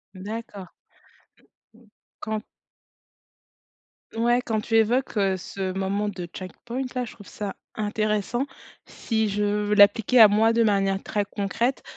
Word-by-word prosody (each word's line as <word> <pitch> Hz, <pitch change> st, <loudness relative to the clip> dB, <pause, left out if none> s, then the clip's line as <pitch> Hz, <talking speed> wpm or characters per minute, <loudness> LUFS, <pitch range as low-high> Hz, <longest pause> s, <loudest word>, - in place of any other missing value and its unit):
D'accord. 205 Hz, -1 st, -7 dB, 1.5 s
Quand 215 Hz, 0 st, -3 dB, 1.7 s
ouais, 240 Hz, +2 st, +2 dB
quand 220 Hz, -2 st, -1 dB
tu 225 Hz, -, -2 dB
évoques, 235 Hz, +3 st, +2 dB
heu, 195 Hz, -2 st, +2 dB
ce 190 Hz, +1 st, -4 dB
moment 195 Hz, +2 st, -1 dB
de 180 Hz, -3 st, -6 dB
checkpoint 235 Hz, +7 st, -6 dB
là, 250 Hz, -1 st, -1 dB
je -, -, -10 dB
trouve 205 Hz, -, -15 dB
ça 205 Hz, -2 st, -6 dB, 0.2 s
intéressant. 215 Hz, +3 st, -1 dB, 0.4 s
Si 220 Hz, -2 st, -1 dB
je 205 Hz, +1 st, -1 dB
veux 210 Hz, 0 st, 0 dB
l'appliquer 220 Hz, +4 st, +5 dB
à 220 Hz, -, +11 dB
moi 220 Hz, +2 st, +3 dB
de 230 Hz, 0 st, +3 dB
manière 195 Hz, -2 st, +1 dB
très 205 Hz, -1 st, -1 dB
concrète, 210 Hz, +6 st, -2 dB
210 Hz, 130 wpm, -25 LUFS, 200-225 Hz, 1.7 s, à